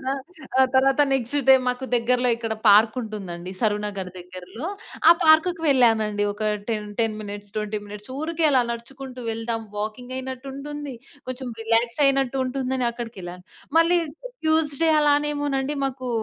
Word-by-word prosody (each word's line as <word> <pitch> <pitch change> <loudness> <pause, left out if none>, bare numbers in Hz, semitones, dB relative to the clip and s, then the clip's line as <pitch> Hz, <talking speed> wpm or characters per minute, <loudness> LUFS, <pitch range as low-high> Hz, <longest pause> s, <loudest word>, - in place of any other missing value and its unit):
తర్వాత - - -14 0.6
ఆ! - - +7
తర్వాత 270 +2 +4
నెక్స్ట్ 265 +1 0
డే 265 - +10
మాకు 250 +1 -2
దగ్గరలో 245 +1 +2
ఇక్కడ 225 -1 -3
పార్క్ 215 +3 +6
ఉంటుందండి. 190 -6 -6
సరునగర్ 205 -3 -1
దగ్గరలో. 185 - -8 0.4
ఆ - - +11
పార్క్‌కి 320 +2 +4
వెళ్ళానండి. 225 -6 +3
ఒక 205 +1 -8 0.3
టెన్ 210 -1 -2
టెన్ 225 -1 +1
మినిట్స్, 205 0 -8
20 210 0 -2
మినిట్స్ 210 +3 -10
ఊరికే 325 +1 -2
అలా 260 -3 +4
నడుచుకుంటూ 255 +2 -7
వెళ్దాం 225 0 -3 0.2
వాకింగ్ 220 +5 -5
అయినట్టు 260 0 -6
ఉంటుంది. 290 0 -6 0.3
కొంచెం 255 0 -5
రిలాక్స్ 230 +3 +1
అయినట్టు 270 -1 +1
ఉంటుందని 255 -1 -1
అక్కడికెళ్ళాను. 190 -7 -8 0.3
మళ్ళీ 340 +2 +4 0.5
ట్యూస్‌డే 315 0 +2
అలానేమోనండి 290 -1 +1
మాకు 260 -1 -3
250 Hz, 135 wpm, -24 LUFS, 215-275 Hz, 0.6 s, ఆ